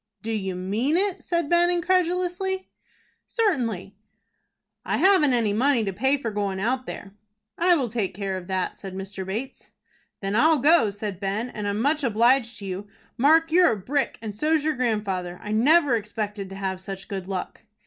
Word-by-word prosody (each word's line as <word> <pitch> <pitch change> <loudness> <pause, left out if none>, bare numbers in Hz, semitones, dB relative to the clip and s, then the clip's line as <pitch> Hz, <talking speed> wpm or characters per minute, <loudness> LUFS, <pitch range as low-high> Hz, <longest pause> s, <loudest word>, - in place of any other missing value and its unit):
"Do 225 - -3
you 195 -4 -2
mean 215 - 0
it?" 390 -1 0
said 340 -3 -1
Ben, 345 +2 +4
incredulously. 365 +1 0 0.6
"Certainly." 235 - -1 0.9
"I - - -1
haven't 370 -8 +4
any 225 -4 +1
money 250 +1 +2
to 195 -2 -2
pay 265 +8 +1
for 235 -5 -4
goin' 200 -2 -2
out 255 +5 -1
there." 195 -1 -8 0.4
"I 350 +1 +4
will 270 -6 0
take 210 -5 -2
care 195 -1 -3
of 180 -1 -7
that," 185 -1 -2
said 195 -2 -8
Mr. 195 0 -6
Bates. 225 +8 -6 0.5
"Then 195 +1 -2
I'll 315 +7 +5
go," 290 -3 +4
said 200 -2 -5
Ben, 205 +5 -2
"and 210 -1 -4
I'm 205 +1 -1
much 295 +5 +1
obliged 235 +1 +2
to 200 - -8
you. 190 +2 -5 0.3
Mark, 320 +5 +4
you're 355 -3 +5
a - - -4
brick, 270 +8 -1
and 215 -2 -4
so's 305 +6 +1
your 310 0 +1
grandfather. 205 -8 -2
I 210 - -7
never 280 +4 +4
expected 210 -2 -4
to 195 - -8
have 190 -1 -3
such 195 +1 -7
good 195 -3 -5
luck." 190 -2 -5
225 Hz, 180 wpm, -25 LUFS, 195-305 Hz, 0.9 s, I'll